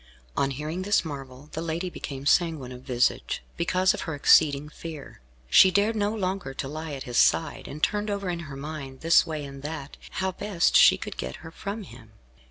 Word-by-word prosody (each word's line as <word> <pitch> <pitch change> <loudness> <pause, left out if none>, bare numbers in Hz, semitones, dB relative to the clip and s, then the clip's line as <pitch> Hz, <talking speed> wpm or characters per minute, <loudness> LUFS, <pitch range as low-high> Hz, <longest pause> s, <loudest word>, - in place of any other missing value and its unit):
On 135 - +1
hearing 150 +6 -4
this 205 -1 +2
marvel 135 -1 -8
the 160 - -4
lady 165 +2 -2
became 140 -4 -7
sanguine 155 -5 +2
of 125 0 -9
visage, 125 - 0
because 185 +2 +2
of - - -5
her 160 - -2
exceeding 145 0 +5
fear. 150 - -9 0.3
She 125 - +7
dared 205 +4 +2
no 205 -1 +1
longer 190 -9 -3
to 135 - -4
lie 155 +1 -5
at 135 -1 -5
his 120 -1 -4
side, 160 -3 +2
and 150 +2 -8
turned 210 0 +1
over 200 -1 -2
in 175 -1 -2
her 135 - -7
mind, 140 -2 -7
this 165 +1 +5
way 155 -2 -4
and 140 0 -9
that, 150 -1 -6 0.2
how 190 0 -1
best 185 -1 0
she - - +8
could - - -7
get 65 - -4
her 160 - -8
from 200 +5 -5
him. 115 - -14
155 Hz, 200 wpm, -26 LUFS, 135-185 Hz, 0.3 s, she